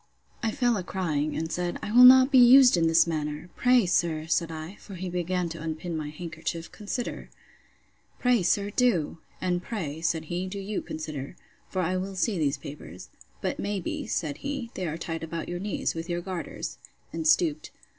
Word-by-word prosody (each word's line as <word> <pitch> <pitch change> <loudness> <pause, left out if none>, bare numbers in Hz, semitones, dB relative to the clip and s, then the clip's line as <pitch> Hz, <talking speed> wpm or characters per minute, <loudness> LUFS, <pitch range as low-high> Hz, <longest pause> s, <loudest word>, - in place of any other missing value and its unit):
I 225 - +1
fell 240 -1 +1
a 185 - -3
crying, 155 -6 -2
and 160 +1 -3
said, 175 +1 -2
I - - -3
will 245 +3 +8
not 260 +1 +9
be 265 - +7
used 250 0 +8
in 165 -1 +2
this 165 0 +5
manner. 155 0 -4
Pray, 250 -3 +4
sir, 165 -3 +1
said 165 0 0
I, 160 +5 -7
(for 200 - -11
he 185 +1 -5
began 180 0 -1
to 165 -1 -7
unpin 160 +2 -4
my 155 -2 -3
handkerchief,) 165 +1 -6
consider! 220 +3 -5 0.9
Pray 245 -3 +3
sir, 200 +3 +1
do!—And 180 -5 0
pray, 160 -7 -5
said 165 -1 0
he, 175 +3 -3
do 195 +2 -6
you 200 +1 -3
consider. 155 -1 -6 0.3
For 185 -1 -1
I 185 +2 0
will 190 +1 -4
see 190 0 0
these 145 -2 +1
papers. 140 - -10 0.3
But - - -2
may 205 0 -2
be, 175 - -4
said 150 -4 -2
he, 275 - -5
they 185 - -3
are 160 +1 -3
tied 165 -1 -4
about 165 0 -5
your 175 0 -4
knees, 200 +1 -2
with 165 +1 -6
your 175 0 -1
garters, 185 -1 -5 0.3
and 320 - -2
stooped. 315 -1 +2
175 Hz, 190 wpm, -27 LUFS, 160-205 Hz, 0.9 s, not